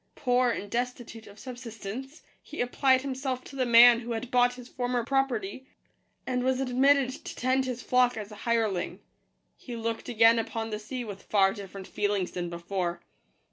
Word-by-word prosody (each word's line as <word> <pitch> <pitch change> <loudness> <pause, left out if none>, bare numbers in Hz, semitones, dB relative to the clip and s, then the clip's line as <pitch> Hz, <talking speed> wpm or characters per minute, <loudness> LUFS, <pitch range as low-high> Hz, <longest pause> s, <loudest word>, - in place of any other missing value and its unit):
Poor, 250 -1 +2
and 205 -3 -4
destitute 240 -2 -4
of 200 - -14
subsistence, 245 - -8 0.2
he 305 - -10
applied 260 +1 +2
himself 260 -1 -3
to 275 - -12
the 255 -2 0
man 235 0 +8
who 235 0 -5
had 230 +2 -5
bought 245 0 +3
his 250 -1 -11
former 245 -2 -2
property, 260 -2 -1 0.6
and 250 -1 -1
was 260 0 +1
ad 255 -2 -2
mitted 275 0 +4
to - - -7
tend 260 +1 +1
his 250 -1 -4
flock 250 -1 +3
as 210 -1 -6
a - - -9
hireling. 220 -6 0 0.6
He 245 - -8
looked 230 +1 -4
again 230 0 +5
upon 225 0 -3
the 210 - -3
sea 245 +4 -5
with 205 -4 -8
far 195 -2 +3
different 195 -2 -9
feelings 205 -3 -1
than 175 -1 -4
before. 175 +1 -3
240 Hz, 180 wpm, -28 LUFS, 215-255 Hz, 0.6 s, man